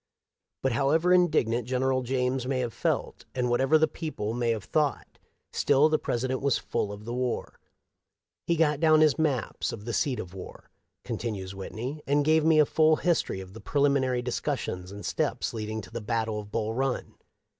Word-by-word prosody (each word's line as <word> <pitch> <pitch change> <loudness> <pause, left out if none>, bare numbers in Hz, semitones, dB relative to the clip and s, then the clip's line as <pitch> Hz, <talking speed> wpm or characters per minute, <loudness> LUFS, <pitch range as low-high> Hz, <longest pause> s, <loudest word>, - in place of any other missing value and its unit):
But, 135 - +2
however 155 +9 +3
indignant 125 -10 +2
General 130 +1 +1
James 125 0 -1
may 135 -1 0
have 120 -2 -3
felt, - - -2
and 125 -1 0
whatever 135 +5 +4
the 160 0 +3
people 115 -10 -4
may 120 0 0
have 110 -3 -1
thought, 150 +5 -1 0.3
still 145 +2 +4
the 155 - +2
President 130 +2 -2
was 140 -1 +2
full 105 - -2
of 105 +1 -9
the 120 - -4
war. 125 -1 -3 0.9
He 170 - +3
got 150 -3 +2
down 155 -1 +5
his 155 -2 +4
maps 140 -7 0
of 105 -2 -8
the 120 - -3
seat 135 -1 0
of 90 - -7
war," 95 - -10 0.3
con - - -3
tinues 100 -5 -4
Whitney, 115 +10 -6
" - - -41
and 145 +1 +2
gave 155 0 +4
me 160 0 +4
a 150 - +6
full 155 +2 +4
history 165 - 0
of 95 0 -11
the 110 - -10
preliminary 140 -3 +1
discussions 90 -6 -3
and 100 0 -8
steps - - -1
leading 110 -1 -4
to 100 - -13
the 115 0 -5
battle 110 -1 -1
of 105 -1 -9
Bull 110 0 -1
Run. 135 +1 -2
125 Hz, 190 wpm, -28 LUFS, 110-150 Hz, 0.9 s, a